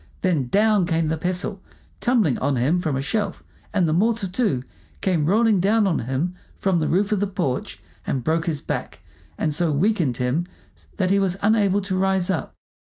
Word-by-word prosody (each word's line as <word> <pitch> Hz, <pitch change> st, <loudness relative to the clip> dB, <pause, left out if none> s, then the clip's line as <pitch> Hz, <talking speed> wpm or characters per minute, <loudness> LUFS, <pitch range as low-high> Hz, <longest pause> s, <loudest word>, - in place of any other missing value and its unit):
Then 165 Hz, -9 st, +1 dB
down 205 Hz, -, +3 dB
came 165 Hz, -2 st, +1 dB
the 160 Hz, -, +1 dB
pestle, 180 Hz, +3 st, -2 dB, 0.4 s
tumbling 230 Hz, -, +2 dB
on 140 Hz, +1 st, 0 dB
him 140 Hz, +9 st, +2 dB
from 155 Hz, -5 st, -1 dB
a 135 Hz, -, -2 dB
shelf, 210 Hz, +7 st, -2 dB, 0.3 s
and 185 Hz, -5 st, +2 dB
the 155 Hz, -, +1 dB
mortar, 220 Hz, +3 st, +1 dB
too, 180 Hz, -, 0 dB, 0.4 s
came 170 Hz, -6 st, +1 dB
rolling 215 Hz, +1 st, +3 dB
down 210 Hz, +4 st, +3 dB
on 180 Hz, -5 st, +1 dB
him 135 Hz, +9 st, -2 dB, 0.2 s
from 190 Hz, -3 st, +1 dB
the 155 Hz, -, 0 dB
roof 195 Hz, +5 st, +1 dB
of 210 Hz, -, +2 dB
the 205 Hz, -, 0 dB
porch 175 Hz, -10 st, -3 dB, 0.3 s
and 130 Hz, -3 st, -1 dB
broke 160 Hz, +4 st, 0 dB
his 150 Hz, -4 st, -1 dB
back, 125 Hz, -, -4 dB, 0.4 s
and 155 Hz, -2 st, 0 dB
so 165 Hz, +1 st, +1 dB
weakened 160 Hz, -, +1 dB
him 135 Hz, +8 st, 0 dB, 0.5 s
that 185 Hz, -2 st, +1 dB
he 200 Hz, -, +4 dB
was 190 Hz, -1 st, 0 dB
unable 205 Hz, -2 st, +3 dB
to 190 Hz, -1 st, -2 dB
rise 190 Hz, -1 st, +1 dB
up. 160 Hz, -7 st, -3 dB
180 Hz, 190 wpm, -23 LUFS, 155-200 Hz, 0.5 s, he